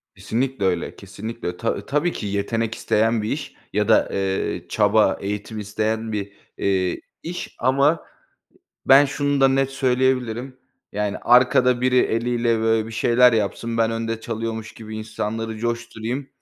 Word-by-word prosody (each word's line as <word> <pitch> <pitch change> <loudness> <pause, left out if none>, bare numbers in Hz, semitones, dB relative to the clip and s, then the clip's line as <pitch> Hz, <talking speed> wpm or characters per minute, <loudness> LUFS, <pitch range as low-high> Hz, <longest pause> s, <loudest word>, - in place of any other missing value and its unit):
Kesinlikle 130 -2 -2
öyle 90 -3 -1
kesinlikle 105 +4 -7
ö 90 0 -4
ta 115 - -2
tabii 150 +5 +1
ki 105 - -5
yetenek 110 +3 -1
isteyen 110 +1 +1
bir 105 - -2
iş 140 -1 -5 0.2
ya 105 0 +1
da, - - +4
eee, 95 -2 -1
çaba, 105 -1 +3
eğitim 105 +2 -4
isteyen 110 +2 -2
bir, 100 -2 -3 0.3
eee, 95 -2 0 0.2
iş 175 +2 -6
ama 140 +5 +2 0.8
ben 135 +2 +8
şunu 145 0 0
da 135 - +6
net 135 0 +1
söyleyebilirim. 130 -1 0 0.4
Yani, 105 0 -2
arkada 125 0 +4
biri 125 0 +2
eliyle, 115 0 +1
böyle, 110 0 +1
bir 115 - -8
şeyler 120 +2 +4
yapsın 115 +2 -1
ben 115 0 +3
önde 115 0 -3
çalıyormuş 115 -1 -4
gibi 110 -1 -8
insanları 110 +1 -4
coşturayım 120 +3 -3
115 Hz, 145 wpm, -22 LUFS, 105-125 Hz, 0.8 s, ben